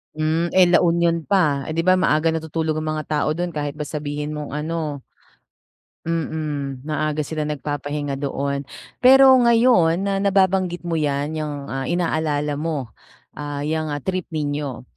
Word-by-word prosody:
Hmm, 155 +2 0
eh, 185 -1 +7
La 175 - +6
Union 170 -1 +1
pa, 150 -8 +2
eh, 155 - -4
'di 165 - +1
ba 185 +1 +4
maaga 160 -2 +2
natutulog 160 0 -2
ang 155 0 -2
mga 155 - -3
tao 150 -1 0
dun 175 +1 -2
kahit 145 -2 -4
ba 150 - -4
sabihin 150 0 -4
mong 150 -2 -5
ano 150 -2 -3 1.1
mm, 150 -5 -3
maaga 155 0 -1
sila 155 +1 -3
nagpapahinga 145 -1 -3
doon. 140 0 -2 0.4
Pero 265 +1 +8
ngayon 235 -8 +4
na 200 0 0
nababanggit 190 -3 +2
mo 170 -1 -1
'yan, 145 0 -1
'yang 155 -1 -3 0.2
ah, 135 0 -3
inaalala 155 -4 -1
mo, 150 -4 -3 0.5
ah, 145 -1 -5
yang 155 0 -2
ah, 145 - -3
trip 185 +4 -3
ninyo. 145 -4 -3
155 Hz, 155 wpm, -22 LUFS, 145-170 Hz, 1.1 s, Pero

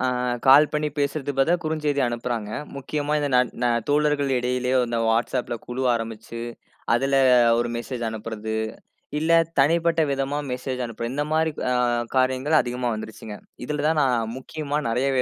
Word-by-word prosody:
ஆ - - 0 0.4
கால் 145 +3 +7
பண்ணி 150 0 0
பேசுறதுக்கு 140 -1 -2
பதிலா 160 +6 +4
குறுஞ்செய்தி 150 -3 -1
அனுப்புறாங்க. 120 -2 -3 0.3
முக்கியமா 145 +2 -3
இந்த 145 -1 -1
ந - - +6 0.2
ந 125 - +3 0.2
தோழர்கள் 145 -1 +2
இடையிலேயே 125 +1 0
இந்த 115 -1 -2
WhatsAppல 120 +2 0
குழு 125 +2 -4
ஆரம்பிச்சு 115 0 -5 0.5
அதில 135 +3 +2 0.4
ஒரு 120 0 0
மெசேஜ் 120 0 -5
அனுப்புறது, 110 0 -5 0.7
இல்ல 160 +2 -2 0.3
தனிப்பட்ட 165 +3 +3
விதமா 135 +1 -1
மெசேஜ் 125 0 -3
அனுப்புறது. 115 +1 -5
இந்தமாரி 155 +2 0 0.2
அ - - +2 0.4
காரியங்கள் 130 +4 +2
அதிகமா 125 0 -3
வந்துருச்சு. 110 0 -8 0.4
இதில 150 +1 -2
தான் 155 -1 +2
நான் 120 -4 +1
முக்கியமா 150 +2 -3
நெறைய 125 +4 +1
130 Hz, 140 wpm, -24 LUFS, 120-150 Hz, 0.7 s, கால்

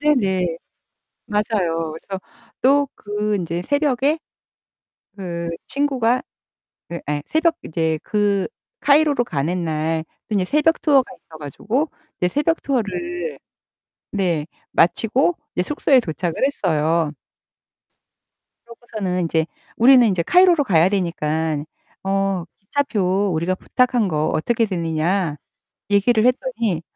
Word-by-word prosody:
네네. 190 - +1 0.7
맞아요. 185 -7 -1
그래서 190 +4 -7 0.4
또 280 +2 +4
그 210 0 -2
인제 170 -1 -3
새벽에 285 - +1 1.0
그 170 -4 -4 0.2
친구가 260 -4 +1 0.7
그 170 - -4
예 145 -1 -1
새벽 325 +1 +2
인제 160 -1 -1
그 205 -2 +1 0.3
카이로로 290 -3 +4
가는 170 -1 -2
날 160 0 -1 0.2
그 215 - -2
인제 195 -2 +2
새벽 300 - +2
투어가 280 -4 +5
있어 160 - -15
가지고 215 - -2 0.3
이제 180 - +2
새벽 310 - 0
투어를 345 - -2 0.7
네 175 -7 0 0.3
마치고 235 - +2 0.2
이제 180 - +1
숙소에 275 +3 +3
도착을 175 -4 -3
했어요. 165 - +1 1.5
그러고서는 215 -6 -4
인제 160 -1 +1 0.3
"우리는 250 +1 +7
인제 185 -5 +1
카이로로 355 - +5
가야 175 -6 +4
되니깐 160 -5 -1 0.4
어 195 -2 0 0.2
기차표 200 -4 0
우리가 170 +4 0
부탁한 245 +2 +1
거 155 -2 0
어떻게 230 +9 +1
되느냐?" 170 -2 -1 0.5
얘기를 215 +3 +3
했더니 250 - 0
200 Hz, 250 characters per minute, -21 LUFS, 170-255 Hz, 1.5 s, 우리는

